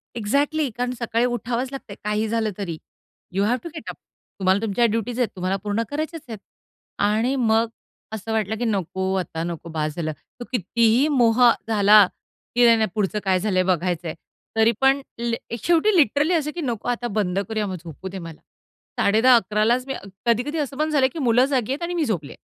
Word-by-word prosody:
Exactly 285 +6 0
कारण 245 0 -1
सकाळी 235 0 +1
उठावंच 245 +1 -2
लागतंय 230 -7 -8
काही 210 +1 0
झालं 220 -1 0
तरी. 170 -6 -4 0.6
यू 195 +1 +1
ह्याव 240 +4 +2
टू 340 - -6
गेट 315 - -7
अप - - -6 0.4
तुम्हाला 190 +1 +3
तुमच्या 225 +2 +1
ड्युटीज 230 +2 -1
आहेत, 245 - +3
तुम्हाला 185 +1 -1
पूर्ण 210 +2 0
करायचेच 310 +2 -4
आहेत. 220 - -6 0.6
आणि 220 +6 +2
मग, 225 -2 +2 0.4
असं 220 +1 -5
वाटलं, 220 -1 0
की 240 - -2
नको, 190 -2 -1
आता 165 -2 -4
नको 170 -1 -5
बस 155 -1 -3
झालं. 155 -2 -2 0.3
तो 240 - -6
कितीही 235 - +2
मोह 245 -4 +3 0.3
झाला, 210 -1 +6 0.5
की 245 0 +5
नाही, 230 -1 +6
नाही 220 -2 +1
पुढचं 210 0 0
काय 190 -1 +3
झालंय 185 -2 +1
बघायच 180 -1 0
आहे, 160 - -3 0.4
तरी 225 +1 +5
पण 270 +1 +4 0.2
लि 235 -1 -1 0.3
शेवटी 345 +4 +3
लिटरली 295 - +3
असं, 300 -2 0
की 345 - -3
नको 240 -5 -3
आता 240 0 -1
बंद 185 -1 0
करूया 215 -2 -1
मग 190 - -4
झोपू 165 +3 -8
दे 190 0 -7
मला. 165 -2 -9 0.6
10:30-11:00 215 -1 +4
लाच 250 +2 +2
मी 270 - -2
अ - - -8 0.2
कधी, 235 +1 +3
कधी 295 +2 -4
असं 280 -1 -3
पण 310 +1 0
झालंय, 270 -3 +4
की 320 - -7
मुलं 245 -1 +4
जागी 260 -3 -1
आहेत 295 +5 -3
आणि 350 +1 -2
मी 330 -4 0
झोपले. 170 -10 -3
225 Hz, 195 wpm, -23 LUFS, 195-255 Hz, 0.6 s, झाला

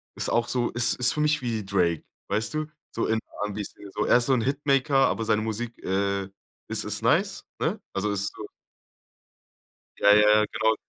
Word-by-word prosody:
ist - - -1
auch 120 0 +1
so 120 -2 0
ist 120 0 +3
ist 125 - +5
für 155 - -4
mich 150 -1 +2
wie 115 -4 -3
Drake, 90 -4 0 0.3
weißt 110 +5 -1
du? 155 0 -2 0.3
So 115 - -1
in 110 - +1 0.3
R'n'B 105 0 -3
Szene, 100 - -12
so. 105 +1 -2
Er - - +5
ist 120 - 0
so 135 - +3
'n 125 - +2
Hitmaker, 135 0 +2
aber 115 - -2
seine 110 -1 +2
Musik, 115 +2 -5
äh, 100 0 -1 0.4
is - - +1
ist - - -3
nice, - - +1 0.2
ne? - - -1
Also, 105 +2 -1
ist 100 0 -1
so - - -7 1.5
Ja, 105 0 +6
ja, 105 0 +5
genau. 110 -1 +2
110 Hz, 195 wpm, -26 LUFS, 105-125 Hz, 1.5 s, Ja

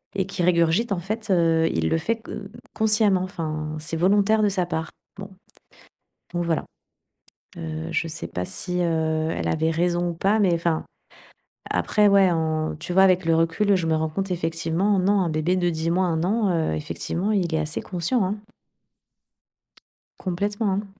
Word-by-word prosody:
et 190 -1 0
qu'il 190 -2 -2
régurgite, 175 +5 +2
en 175 - -2
fait, 215 +4 -5
heu, 165 -2 +3
il 80 0 0
le - - +2
fait 225 +8 -1
q - - -11
heu, 195 -1 -7 0.2
consciemment. 210 -4 +3
Enfin, 155 -4 -4
c'est 165 +2 -4
volontaire 205 +5 +3
de 205 - +4
sa 185 -2 0
part». 165 -1 -3 0.3
Bon 195 0 -7 1.0
bon 175 - -1
voilà, 170 -2 -1 0.9
heu, 80 0 -5
je - - 0
sais 120 - -6
pas 90 +2 -4
si, 180 - -2
heu, 160 -1 0
elle - - -3
avait 160 +1 +1
raison 175 +1 0
ou - - -3
pas, 200 +6 +1
mais 190 -4 +3
enfin, 165 -1 0 0.9
après, 210 -1 +2
ouais, 200 -2 +5
en 155 -1 -1
tu 170 +3 -5
vois, 190 - +5
avec 185 -2 +3
le 165 0 +3
recul, 165 +5 +2
je 170 -3 -1
me 160 - +2
rends 160 0 -1
compte 195 +5 -3
effectivement, 165 +4 0
non, 195 +2 +2
un 175 - 0
bébé 155 +4 0
de 175 -1 +1
10 160 0 -2
mois, 185 +2 +2
1 160 -2 0
an, 210 +1 +1 0.2
heu, - - -1
effectivement 85 - -3
il 180 -5 0
est - - +1
assez 155 0 -3
conscient, 190 +6 -1
hein. 195 +3 -1 1.9
Complètement, 205 +4 -1
hein. 200 +2 -2
175 Hz, 185 wpm, -24 LUFS, 160-195 Hz, 1.9 s, ouais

